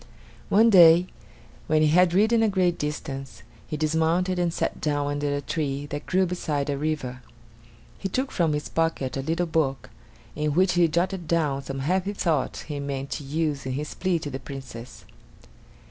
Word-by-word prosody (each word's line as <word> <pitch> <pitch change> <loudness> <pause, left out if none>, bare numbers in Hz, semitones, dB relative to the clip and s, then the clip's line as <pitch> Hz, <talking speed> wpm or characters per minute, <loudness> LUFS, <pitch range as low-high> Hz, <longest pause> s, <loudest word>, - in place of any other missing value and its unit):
One 225 +3 +5
day 175 -2 +8 0.6
when 155 0 +3
he 155 - +4
had 175 +2 +4
ridden 220 +4 +4
a 220 - +3
great 185 -3 +1
distance, 135 -2 -5 0.2
he 155 - -4
dismounted 160 +4 +1
and 175 -1 +1
sat - - -3
down 145 -1 0
under 145 0 -1
a 145 - -2
tree 145 -2 -3
that 145 0 -5
grew 185 0 +2
beside 150 -5 -2
a - - -1
river. 145 -5 -3 0.8
He 195 - -3
took 260 +7 -2
from 165 -4 +1
his 150 0 -3
pocket 165 -6 -1
a 135 - -2
little 165 +5 -1
book, 155 -5 -1 0.4
in 150 0 -1
which 185 +1 +3
he 175 -1 +4
jotted 175 +2 -1
down 150 -5 +1
some 135 0 -5
happy 185 +7 0
thoughts 160 -8 -1
that - - -14
he 145 -1 -3
meant 140 -1 -4
to 150 - -4
use 145 -1 -2
in 130 - -2
his 150 +3 -4
plea 185 -2 0
to 150 -3 -6
the 135 - -5
Princess. 130 -3 -9
155 Hz, 185 wpm, -25 LUFS, 140-175 Hz, 0.8 s, day